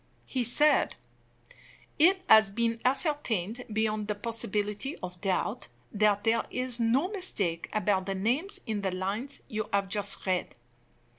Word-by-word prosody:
He 255 -2 -2
said: 295 +6 +4 1.0
"It 370 +4 +4
has 220 -2 +7
been 230 +2 -1
ascertained 250 - 0
beyond 215 -1 -1
the 210 - -2
possibility 210 +3 -1
of 180 -1 -8
doubt 190 -10 -2 0.2
that 205 -1 +2
there 230 0 +2
is 250 -1 -3
no 245 +9 +2
mistake 205 - -1
about 200 -3 0
the 195 - -2
name 240 - 0 0.2
in 215 -4 -3
the 195 - -1
lines 200 +9 -4
you 215 0 -4
have 200 -1 +1
just 205 0 -1
read. 185 -2 -1
215 Hz, 140 wpm, -28 LUFS, 200-250 Hz, 1.0 s, has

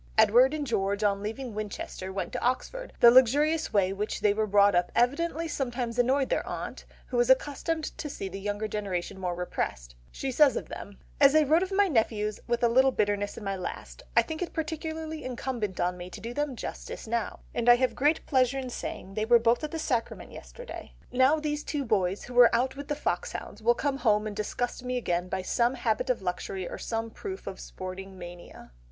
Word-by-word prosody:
Edward 230 +5 +6
and 295 -2 -2
George 200 -4 0
on 200 -1 +2
leaving 225 +3 -5
Winchester 205 -2 -5
went 190 -2 -4
to - - -3
Oxford; - - -2
the 235 - +10
luxurious 290 +6 +4
way 195 -3 +3
in 195 - -5
which 210 +1 -3
they 205 -1 +4
were 215 +1 0
brought 200 0 +5
up 175 0 +2
evidently 325 +6 +1
sometimes 245 -5 -3
annoyed 265 +2 +3
their - - +1
aunt, - - -6 0.2
who 250 - -3
was 240 +1 +3
accustomed 295 +4 +2 0.2
to 300 - -4
see 195 - -5
the 195 +1 -6
younger 205 +2 -2
generation 195 -3 -3
more 180 -2 -2
repressed; - - -4 0.2
she 270 - -3
says 285 +1 +5
of - - -5
them— 200 0 -8 0.2
"As 280 +1 +6
I 310 - +6
wrote 310 +4 +4
of 380 +1 -2
my 400 +1 +4
nephews 220 - 0
with 240 0 0
a - - +6
little 260 +3 +5
bitterness 205 -4 -1
in 225 - -7
my 195 -1 -2
last, 70 - -7 0.2
I - - +7
think 315 +1 -6
it 355 - -3
particularly 315 0 -4
incumbent 240 -6 -3
on 180 0 0
me 175 0 -7
to - - -9
do 235 +2 -6
them 290 -1 -2
justice - - -7
now, 230 0 -2
and 240 0 +1
I 240 - +10
have 255 +1 +1
great 295 +4 +1
pleasure 260 -1 +2
in 260 -2 -4
saying 195 -4 -6
they 215 +1 -1
were 240 +1 +7
both 235 +4 +2
at 305 - -2
the 325 - -4
Sacrament 250 -7 -2
yesterday; - - -10 0.2
now 260 +5 +4
these 295 -1 -2
two 285 -3 -3
boys, 195 -4 0
who 245 0 -1
are 240 -1 +8
out 255 +3 +1
with 285 0 -7
the 295 - -1
foxhounds, 210 -3 -3
will 240 +2 +4
come 280 0 -1
home 215 -5 +2
and 210 -1 -4
disgust 240 +4 -3
me 250 0 -2
again 180 -6 -1
by 190 0 -2
some 240 +6 +1
habit 245 +1 -1
of 245 -6 0
luxury 180 0 -3
or - - -7
some 225 0 -3
proof 385 - -7
of 190 - -6
sporting 190 +1 -8
mania." 175 - -11
235 Hz, 215 wpm, -28 LUFS, 200-275 Hz, 0.2 s, the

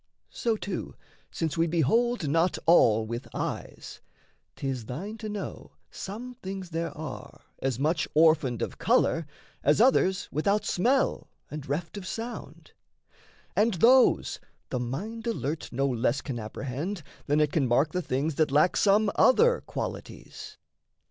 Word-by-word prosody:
So, 230 -2 -1
too, 200 -3 -5 0.3
since 165 -1 -3
we 165 - +3
behold 175 - +1
not 165 +5 +2
all 115 -10 +5
with 115 +2 -5
eyes, - - -5 0.5
'Tis 130 -4 -4
thine 190 - -5
to 215 - -5
know 205 -1 -6 0.2
some 235 +6 -7
things 190 -2 -6
there 165 +1 -2
are 155 -3 -8 0.2
as 130 -3 -1
much 155 +5 0
Orphaned 155 -6 +4
of - - -5
colour, 165 -2 +2 0.4
as 145 +6 +3
others 200 -6 +3
without 200 +8 +1
smell, 250 +9 +1 0.2
And 150 -3 -7
reft 165 +8 -3
of 185 - -9
sound; 230 +2 -7 0.8
and 215 0 +3
those 250 +8 +4 0.3
the 125 - -1
mind 205 - -4
alert 155 - -3
No 135 +3 0
less 125 +1 0
can 130 -5 -5
apprehend 140 - -5 0.2
than 145 +1 +2
it 150 -2 +2
can 145 -4 +1
mark 135 +6 +2
The 180 - -1
things 145 +1 -1
that 155 -2 +3
lack 150 +6 +3
some 205 +1 +4
other 475 - +4
qualities. - - -7
165 Hz, 140 wpm, -27 LUFS, 140-205 Hz, 0.8 s, all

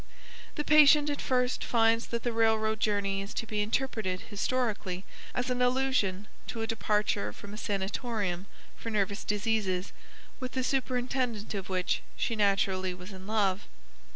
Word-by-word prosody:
The 295 - -1
patient 300 -1 +7
at 285 - -3
first 250 -1 +1
finds 230 0 +3
that 235 -1 -3
the 240 - 0
railroad 220 -1 +2
journey 200 -2 +1
is 195 - -7
to - - -2
be 215 -1 -1
interpreted 215 -4 -1
historically 205 -4 -1 0.3
as 250 0 0
an 250 0 0
allusion 250 -7 +2 0.2
to 225 -2 -3
a - - 0
departure 210 -2 0
from 205 0 -10
a - - -5
sanatorium 200 -2 -2 0.3
for 230 - -6
nervous 200 -1 0
diseases, 205 -3 0 0.5
with 255 0 -5
the 260 - 0
superintendent 250 -4 -1
of 195 -2 -4
which 185 -1 0 0.2
she 230 - 0
naturally 195 -3 +2
was 180 +3 -10
in 190 0 -10
love. 205 -3 +1
215 Hz, 155 wpm, -30 LUFS, 195-245 Hz, 0.5 s, patient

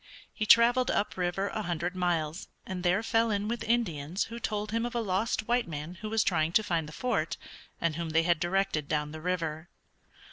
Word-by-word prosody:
He 215 - -2
traveled 245 +3 +6
up 205 - 0
river 185 +2 -1
a 215 - -3
hundred 175 -1 -2
miles, 170 -2 -1 0.2
and 185 -1 -4
there 180 +4 +2
fell 225 0 +2
in 205 -1 0
with 235 +1 -2
Indians 180 -7 0
who 230 +1 -7
told 210 -1 -2
him 230 +1 0
of 240 0 -3
a - - +2
lost 215 +1 0
white 240 -2 +2
man 155 +1 -5
who 215 - -4
was 220 0 +2
trying 160 +1 +1
to 220 - +4
find 165 -6 -1
the - - -10
Fort, 210 -6 -1 0.4
and 165 -2 0
whom 170 -1 -3
they 165 +1 +3
had 170 -1 +2
directed 175 -4 0
down 150 0 -1
the 155 0 -8
river. 165 -2 -2
185 Hz, 210 wpm, -29 LUFS, 165-220 Hz, 0.4 s, traveled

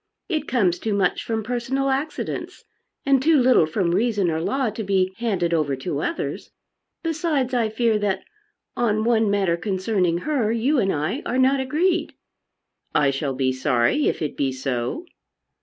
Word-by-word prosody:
It 320 -5 -2
comes 190 -9 +1
too 215 -2 -1
much 190 -3 +1
from 225 -1 -2
personal 250 +4 -1
accidents, 275 +4 -4 0.4
and 275 -2 +4
too 315 +2 +4
little 250 - +4
from 170 +2 0
reason 205 -3 +1
or 160 0 -1
law 220 +6 0
to 220 +1 -5
be 190 -1 +1
handed 190 -8 0
over 150 -4 +1
to 140 +2 -3
others. 335 - -3 0.5
Besides, 310 -5 -1
I 235 -3 +1
fear, 220 0 +1
that 195 -2 -1 0.5
on 215 -3 +1
one 225 -2 +2
matter 195 -4 +2
concerning 185 -2 0
her 255 -6 0
you 250 +5 +1
and 195 -4 +2
I 160 - -2
are 250 - -2
not 265 +1 +3
agreed." 330 +7 0 0.8
"I 140 -2 +4
shall 135 0 -2
be 130 0 +1
sorry 130 - +1
if - - -1
it 150 - -3
be 135 -2 0
so." 130 - -3
215 Hz, 165 wpm, -23 LUFS, 170-260 Hz, 0.8 s, and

